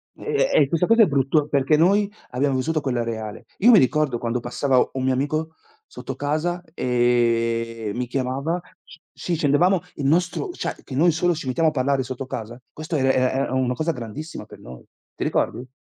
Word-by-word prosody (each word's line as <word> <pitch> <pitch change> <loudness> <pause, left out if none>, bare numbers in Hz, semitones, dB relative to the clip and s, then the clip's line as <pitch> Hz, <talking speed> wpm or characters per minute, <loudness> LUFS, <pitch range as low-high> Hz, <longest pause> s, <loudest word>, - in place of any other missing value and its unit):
E - - -13 0.3
e - - +5
e 140 - +3
questa 165 +4 +1
cosa 230 +2 +5
è 210 - +7
brutto 145 +1 +1
perché 140 +1 +2
noi 200 +5 +3 0.2
abbiamo 135 +2 0
vissuto 155 +4 0
quella 125 -4 -1
reale. 110 -2 -6
Io 235 +5 +6
mi 215 - +8
ricordo 145 -2 +1
quando 120 +1 -2
passava 130 +2 0 0.2
un 130 -1 -3
mio 130 0 +2
amico 155 +4 -2 0.3
sotto - - -7
casa 155 +5 -1
e 115 -3 +1
mi 125 0 -2
chiamava 135 +7 -2 0.2
sc - - -16
sì, 175 - -2
scendevamo, 160 +5 +3 0.2
il 140 - -4
nostro 175 - +1
cioè - - -4
che 130 - -8
noi 170 +5 +4
solo 175 +3 +1
ci 150 - -7
mettiamo 155 +6 +2
a - - -5
parlare 135 -1 +1
sotto 130 +1 -6
casa, 120 +2 -6
questo 155 +1 -5
era 135 -2 +3
era 130 -1 +2
era 135 +1 0
era - - -5
una 130 -1 +1
cosa 155 +5 -1
grandissima 125 +5 -7
per - - -14
noi. 60 0 -12 0.3
Ti - - -4
ricordi? 125 +2 -1
135 Hz, 200 wpm, -23 LUFS, 125-160 Hz, 0.3 s, mi